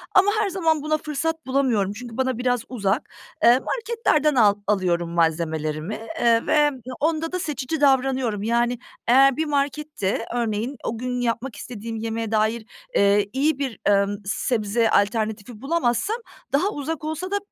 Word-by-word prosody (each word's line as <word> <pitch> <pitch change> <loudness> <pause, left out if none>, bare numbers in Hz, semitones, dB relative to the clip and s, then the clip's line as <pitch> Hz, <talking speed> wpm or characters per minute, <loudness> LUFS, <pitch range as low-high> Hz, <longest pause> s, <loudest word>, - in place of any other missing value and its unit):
ama 390 +2 +6
her 410 -2 +1
zaman 325 -5 +1
buna 310 +1 0
fırsat 320 +1 -3
bulamıyorum. 245 -7 +1
Çünkü 240 +1 -9
bana 260 -2 0
biraz 245 -2 0
uzak. 215 0 -1 0.4
Iıı, 245 +3 +6
marketlerden 445 - +1
al 210 -4 +5
alıyorum 175 -4 +1
malzemelerimi, 160 +2 -1 0.2
ııı, 230 -1 +3
ve 295 -1 +4 0.3
onda 320 +2 0
da 365 - -2
seçici 300 -1 -3
davranıyorum. 260 -6 +2
Yani 235 +1 +1 0.3
eğer 270 +3 +6
bir 315 - 0
markette 285 -7 -1
örneğin 235 +2 -1
o 230 - -3
gün 250 +1 -3
yapmak 240 +1 -2
istediğim 230 -2 -7
yemeğe 225 0 -3
dair, 220 +1 +1 0.3
ııı, 200 +1 +5
iyi 285 +2 +1
bir, 260 -6 -3
emm, 200 0 +3
sebze 220 +1 0
alternatifi 215 +2 0
bulamazsam 325 - 0 0.4
daha 310 +8 +3
uzak 310 -2 -4
olsa 315 +5 -4
da, 405 - +2
245 Hz, 145 wpm, -23 LUFS, 215-300 Hz, 0.4 s, ama